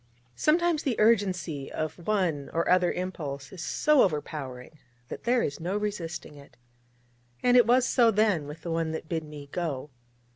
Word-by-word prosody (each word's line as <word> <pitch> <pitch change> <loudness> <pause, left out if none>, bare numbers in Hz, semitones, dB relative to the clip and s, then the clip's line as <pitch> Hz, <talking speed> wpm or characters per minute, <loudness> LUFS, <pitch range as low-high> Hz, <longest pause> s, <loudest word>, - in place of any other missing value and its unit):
Sometimes 330 - +2
the 255 -6 -1
urgency 185 -10 +1
of 155 +2 -5
one 180 -9 0
or 165 +1 0
other 180 -1 +4
impulse 145 -7 -5
is 185 - -8
so 300 - +3
overpowering, 150 -4 -3 0.3
that - - -8
there 240 0 +3
is 140 - -3
no 180 +5 -2
resisting 175 -7 -4
it: 140 - -16 0.9
and 245 0 +4
it 245 -3 +6
was 250 +1 +4
so 240 -3 +4
then 205 -8 +2
with 150 +3 -9
the 170 - -4
one 165 -1 -1
that 160 - -5
bid 165 -1 -2
me 150 -2 -10
go. 150 -5 -3
170 Hz, 170 wpm, -28 LUFS, 150-215 Hz, 0.9 s, it